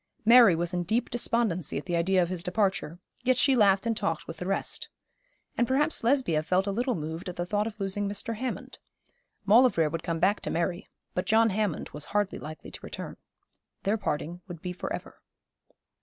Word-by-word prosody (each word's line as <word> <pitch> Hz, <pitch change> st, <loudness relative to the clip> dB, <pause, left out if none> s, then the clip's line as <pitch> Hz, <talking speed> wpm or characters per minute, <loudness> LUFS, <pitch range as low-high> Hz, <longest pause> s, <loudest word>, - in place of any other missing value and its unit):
Mary 230 Hz, -5 st, +8 dB
was 170 Hz, +2 st, -1 dB
in 175 Hz, -, 0 dB
deep 220 Hz, +8 st, -1 dB
despondency 230 Hz, -, 0 dB
at 140 Hz, -, -5 dB
the 175 Hz, -, -1 dB
idea 180 Hz, +2 st, +3 dB
of 170 Hz, -, -3 dB
his 180 Hz, -2 st, -3 dB
departure, 190 Hz, -3 st, 0 dB, 0.3 s
yet 255 Hz, 0 st, +3 dB
she 270 Hz, 0 st, +4 dB
laughed 200 Hz, -3 st, +4 dB
and 230 Hz, -1 st, +1 dB
talked 165 Hz, -6 st, -2 dB
with 165 Hz, -, -7 dB
the 180 Hz, -, -5 dB
rest. 195 Hz, -, -2 dB, 0.7 s
And 240 Hz, -, +3 dB
perhaps 295 Hz, +3 st, +2 dB
Lesbia 235 Hz, -, +2 dB
felt 180 Hz, +4 st, +1 dB
a 200 Hz, -, -1 dB
little 245 Hz, +4 st, 0 dB
moved 160 Hz, +3 st, -5 dB
at 180 Hz, -, -7 dB
the 175 Hz, -, -2 dB
thought 205 Hz, +3 st, 0 dB
of 220 Hz, -1 st, -8 dB
losing 200 Hz, +1 st, -2 dB
Mr. 205 Hz, +3 st, -3 dB
Hammond. 255 Hz, +2 st, -5 dB, 0.7 s
Maulevrier 205 Hz, -, +5 dB
would 165 Hz, 0 st, -3 dB
come 165 Hz, 0 st, -2 dB
back 195 Hz, +5 st, +2 dB
to -, -, -3 dB
Mary, 175 Hz, +3 st, -2 dB, 0.3 s
but 180 Hz, -, -2 dB
John 225 Hz, 0 st, +4 dB
Hammond 205 Hz, -4 st, -1 dB
was 150 Hz, 0 st, -3 dB
hardly 205 Hz, -1 st, -1 dB
likely 155 Hz, +1 st, -9 dB
to -, -, -8 dB
return. -, -, -7 dB, 0.7 s
Their 200 Hz, +2 st, +2 dB
parting 175 Hz, -1 st, -3 dB
would 175 Hz, -3 st, -8 dB
be 180 Hz, +2 st, -5 dB
for 180 Hz, -, -6 dB
ever. -, -, -6 dB
195 Hz, 200 wpm, -28 LUFS, 170-225 Hz, 0.7 s, Mary